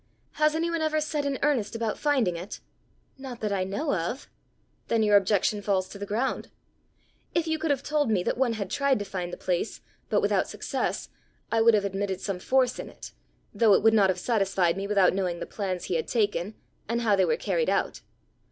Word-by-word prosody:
Has 305 0 +2
any 335 +1 0
one 335 -1 -1
ever 310 0 +1
set 300 -1 -2
in 280 -1 -1
earnest 265 -8 +1
about 225 -1 -1
finding 265 - +1
it?" 175 +4 -7 0.6
"Not 260 -3 -7
that 210 -2 -1
I 190 -2 0
know 240 +11 -2
of." 185 +9 -3 0.6
"Then 225 -1 +2
your 210 -1 +4
objection 205 +1 +3
falls 195 -2 0
to 200 - -10
the 200 - -5
ground. 230 +6 -1 0.9
If 335 - +2
you 320 -1 -1
could 325 - -1
have 280 -2 +1
told 300 -4 +1
me 195 -5 +2
that - - 0
one 245 -2 +1
had 200 -4 -4
tried 280 -2 +2
to 205 - -4
find 180 -3 -4
the - - -6
place, 180 +4 -2 0.3
but - - +3
without - - +1
success, - - -3 0.4
I 225 - +3
would 230 0 +6
have 205 -1 +1
admitted 195 -1 -2
some 195 -2 -3
force 255 +4 +1
in - - -6
it, - - -11 0.4
though 220 -4 +5
it - - +1
would 225 0 +6
not 200 -3 +5
have 185 - +1
satisfied 195 -5 +1
me 195 +1 -3
without 200 -3 +4
knowing 180 -3 -1
the - - -4
plans 185 -4 -4
he - - -3
had 160 - -3
taken, 205 -3 0 0.3
and 235 +1 0
how 215 -3 +3
they 190 - +3
were 470 - +1
carried 485 0 0
out. - - 0
215 Hz, 215 wpm, -27 LUFS, 195-265 Hz, 0.9 s, would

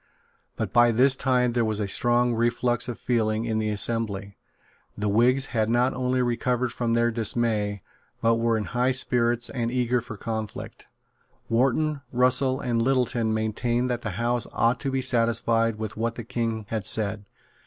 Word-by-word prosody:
But - - -4
by 120 0 +6
this 130 +4 +4
time 125 -2 +1
there 120 -1 +1
was 110 -1 -1
a 105 - -1
strong 120 +3 +2
reflux 120 +1 0
of 120 - -5
feeling 110 -2 0
in 110 -1 -1
the 110 0 -1
assembly. 100 -2 -1 0.6
The 105 - -2
Whigs 125 +6 +3
had 110 -2 +1
not 120 +3 +2
only 125 0 0
recovered 125 0 -1
from 115 -1 -1
their 120 0 +2
dismay, 110 -3 -1 0.4
but 115 0 +2
were 115 -1 +1
in 110 - -2
high 125 +4 0
spirits 120 -2 0
and 120 -3 -2
eager 125 0 0
for 115 -3 -9
conflict. 110 -1 -6 0.6
Wharton, 135 +5 +1
Russell 130 +1 +3
and 120 -4 -1
Littleton 125 -3 +1
maintained 120 +3 -1
that 120 -1 -2
the 105 -5 -5
House 120 0 -1
ought 115 +2 +2
to 140 - -2
be 135 -1 -1
satisfied 115 -2 +1
with 110 -1 -6
what 115 +1 -2
the 120 - -6
King 115 -2 -3
had 110 -4 -3
said. 105 -1 -1
120 Hz, 170 wpm, -25 LUFS, 110-125 Hz, 0.6 s, by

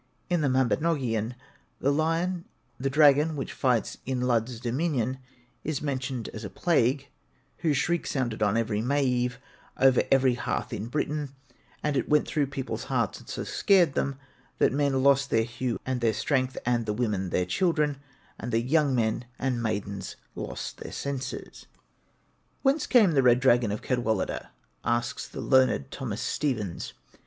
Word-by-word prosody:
In 175 -2 +2
the 145 - +2
'Mabinogion,' 130 -3 +1 0.4
the 155 -3 -1
dragon 150 +2 +5
which 135 - -4
fights 125 -5 0
in 130 -1 -2
Lludd's 120 -1 0
dominion 130 0 -1 0.4
is 155 -3 -2
mentioned 130 -4 -2
as 110 - -7
a 100 - -5
plague, 140 - +1 0.5
whose 155 -5 +1
shriek 170 +5 0
sounded 120 -6 -2
on 105 +1 +3
every 110 -2 0
May 140 +5 +1
eve 125 -1 0 0.4
over 130 -1 +5
every 135 -2 +5
hearth 120 - -3
in 110 0 -4
Britain; 145 +1 -2 0.5
and 150 -1 0
it - - 0
'went 150 0 +3
through 145 -2 0
people's 135 -1 -4
hearts, - - -1
and - - -15
so - - -3
scared 180 -7 +3
them, 135 0 -1 0.4
that - - +3
the - - -3
men 140 -2 +2
lost 140 0 +4
their 115 - +3
hue 120 +1 -3
and 130 -1 -2
their 115 -2 +3
strength, 130 +3 0
and 120 -2 +1
the 105 - 0
women 105 -5 -1
their 90 - +1
children, 150 - +1 0.4
and 120 - -4
the 115 - +3
young 140 +2 +2
men 115 0 0
and 125 -3 -1
maidens 100 -3 -3 0.2
lost - - -6
their - - -7
senses.' 135 -1 -5 1.0
'Whence 280 +2 +2
came 220 -8 +5
the 140 -4 +4
red 125 -1 +5
dragon 120 -4 +4
of 105 - -4
Cadwaladr?' 115 -6 -1 0.4
asks 120 0 -1
the - - -7
learned 130 +1 +3
Thomas 120 -5 -4
Stephens. 110 - -2
130 Hz, 160 wpm, -27 LUFS, 120-145 Hz, 1.0 s, dragon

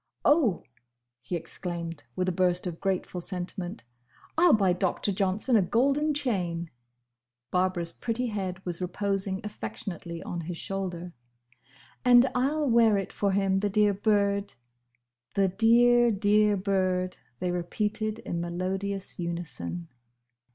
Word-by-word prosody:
"Oh!" 290 - +3 0.6
he 125 +9 -4
exclaimed, 170 -2 -5
with 185 0 -1
a - - +2
burst 180 0 +1
of 175 -2 -4
grateful 185 -2 -2
sentiment, 180 - -5 0.5
"I 345 +2 +5
'll 335 - +6
buy 195 -4 +4
Doctor 185 +3 0
Johnson 195 +5 +1
a 215 - +6
golden 280 - +2
chain!" 175 - -2 0.8
Barbara's 180 -2 +2
pretty 240 +5 -2
head 190 -5 -4
was 175 0 -3
reposing 195 +1 -1
affectionately 170 - -6
on 175 - -4
his 170 +1 -5
shoulder. 180 -3 -4 0.9
"And 245 0 +7
I 250 +1 +2
'll 305 -1 -1
wear 230 -3 +5
it 195 - -4
for 200 -1 0
him. 195 -1 +2
The 205 +1 0
dear 210 0 +3
bird." 200 0 +1 0.8
"The 195 -1 +3
dear, 240 +4 +5
dear 210 0 +3
bird!" 185 -1 0 0.2
they 180 - -1
repeated 210 +5 -2
in 170 - -2
melodious 190 +3 -3
unison. 170 0 -4
195 Hz, 130 wpm, -28 LUFS, 175-215 Hz, 0.9 s, And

